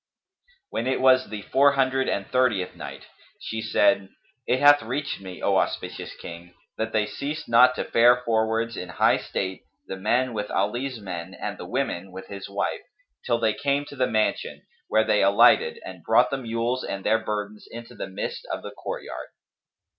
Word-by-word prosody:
When 115 - -2
it 130 - +1
was 130 0 +4
the 105 -1 -6
Four 140 +1 +4
Hundred 135 -1 +1
and 100 - -1
Thirtieth 120 -8 +1
Night, - - -9 0.3
She 110 0 -4
said, 105 -2 +2 0.4
It 130 - +2
hath 145 0 +7
reached 130 +1 -3
me, 95 -2 -9
O - - +3
auspicious - - -2
King, 85 +1 -10 0.2
that 110 0 -3
they 110 -1 +1
ceased 145 +8 -5
not 125 +2 +6
to - - -2
fare 120 +1 +4
forwards 115 0 0
in 90 - -6
high 90 - +3
state, 95 -1 -4 0.2
the - - -5
men 120 +6 +1
with 105 -1 -3
Ali's 120 +5 -1
men 95 -2 -6
and - - -5
the - - -7
women 95 +2 -2
with 95 +1 -10
his 100 -1 -7
wife, 100 - -2 0.5
till 120 -2 +2
they 110 -2 +1
came 140 +3 0
to - - -10
the 130 -1 +1
mansion, 110 -1 -1 0.2
where 110 - +3
they 105 -1 +3
alighted 120 - +5
and - - -9
brought - - +3
the 135 - 0
mules 120 +1 -2
and 100 -1 -5
their 110 +1 +3
burdens 105 -1 -5
into 115 0 -9
the - - -6
midst 95 - -5
of - - -4
the - - -7
courtyard. - - -6
115 Hz, 185 wpm, -25 LUFS, 100-130 Hz, 0.5 s, hath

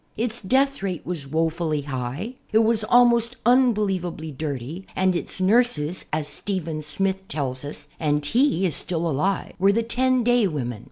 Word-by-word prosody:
Its 235 +1 -2
death 270 +6 +1
rate 185 -4 -4
was 160 -5 -5
woefully 160 0 0
high; 140 - -4 0.2
it 215 - +3
was 220 -1 +2
almost 235 0 +4
unbe 250 -1 +5
lievably 180 -7 -3
dirty, 150 +5 -5
and 185 -1 +2
its 175 - -3
nurses, 185 -5 +2
as 155 -1 -1
Stephen 165 -6 -2
Smith 190 +6 0
tells 135 -3 -4
us, 145 0 -6
and 150 -1 0
he 230 - +2
is 165 -6 0
still 170 -1 -2
alive, 165 +6 -1
were 195 +2 +5
the 230 +3 +1
"ten 255 +2 +1
day 245 -2 +3
women." 125 - -4
185 Hz, 165 wpm, -23 LUFS, 150-225 Hz, 0.2 s, unbe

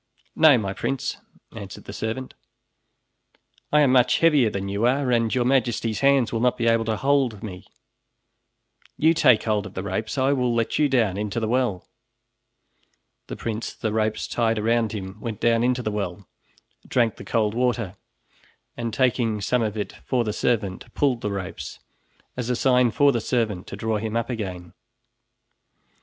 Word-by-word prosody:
"No, 155 -4 +6
my 100 -4 -2
prince," 135 +6 -3 0.4
answered - - -8
the - - -9
servant, 115 +4 -4 1.4
"I 150 - +5
am 140 -3 +4
much 125 -1 +4
heavier 150 -8 +4
than 100 -1 -4
you 100 +4 0
are, 130 0 +1
and 115 -1 +1
Your 125 -1 +1
Majesty's 120 -4 +1
hands 135 -4 +3
will 115 - 0
not 125 +1 +2
be 115 - -1
able 115 -1 +3
to 110 -1 -1
hold 135 -6 +1
me. 90 -4 -8 1.3
You 160 +2 +4
take 130 -9 +4
hold 105 -3 0
of 95 - -14
the 95 - -3
ropes, 110 +4 -3
and 130 - +2
I 140 - +3
will 125 -3 0
let 115 +4 0
you 150 -1 +3
down 110 -8 +1
into 105 +2 -2
the 110 - -1
well." 120 -6 0 1.4
The - - -6
prince, 115 0 -4
the 110 -2 -3
ropes 110 0 -1
tied 115 -2 0
around 115 0 +1
him, 95 -1 -6
went 110 -3 -5
down 115 0 +2
into 125 0 +1
the 110 - -1
well, 100 -3 -4 0.6
drank 115 -4 +1
the - - -9
cold 110 -3 0
water, 115 -5 -1 0.8
and 115 -1 -3
taking 120 -3 +1
some 125 +4 0
of 110 -1 -2
it 105 - -4
for 125 -2 +1
the 105 -2 -2
servant, 105 -6 -1
pulled 130 -5 +1
the 105 - -2
ropes, 100 -2 -6 0.6
as 125 -1 -4
a 125 - +1
sign 125 -1 +3
for 140 +5 +4
the 120 -3 -1
servant 110 -7 -1
to - - -7
draw 110 +2 -1
him 110 +1 -2
up 115 +2 -2
again. 90 -7 -5
115 Hz, 175 wpm, -24 LUFS, 105-125 Hz, 1.4 s, No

